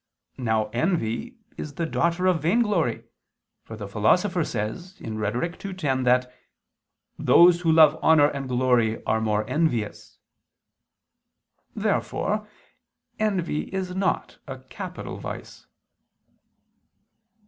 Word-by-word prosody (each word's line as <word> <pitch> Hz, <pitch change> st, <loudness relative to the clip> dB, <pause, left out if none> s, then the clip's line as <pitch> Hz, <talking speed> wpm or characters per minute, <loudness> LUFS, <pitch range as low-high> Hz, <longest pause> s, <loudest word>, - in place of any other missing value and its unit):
Now 110 Hz, -3 st, 0 dB
envy 165 Hz, -, -1 dB, 0.2 s
is 145 Hz, -2 st, -7 dB
the 170 Hz, -, -1 dB
daughter 170 Hz, +2 st, 0 dB
of 180 Hz, -4 st, +2 dB
vainglory; 205 Hz, -, +1 dB, 0.6 s
for 110 Hz, -, -10 dB
the 105 Hz, -2 st, -6 dB
Philosopher 170 Hz, -, +2 dB
says 125 Hz, -, -4 dB
(Rhet. 110 Hz, -, -3 dB
ii, 195 Hz, -1 st, -4 dB
10) 135 Hz, -7 st, -1 dB
that 125 Hz, 0 st, +2 dB, 0.9 s
"those 175 Hz, 0 st, +6 dB
who 165 Hz, -2 st, +2 dB
love 160 Hz, -1 st, +6 dB
honor 155 Hz, -2 st, +5 dB
and 140 Hz, -2 st, -5 dB
glory 125 Hz, -3 st, +1 dB
are 110 Hz, 0 st, +1 dB
more 105 Hz, -1 st, 0 dB
envious." 130 Hz, -6 st, -2 dB, 1.6 s
Therefore 210 Hz, +1 st, -1 dB, 0.7 s
envy 190 Hz, -8 st, -1 dB
is 185 Hz, -1 st, -3 dB
not 190 Hz, 0 st, -1 dB
a -, -, -6 dB
capital -, -, -8 dB
vice. -, -, -8 dB
150 Hz, 105 wpm, -25 LUFS, 115-180 Hz, 1.6 s, those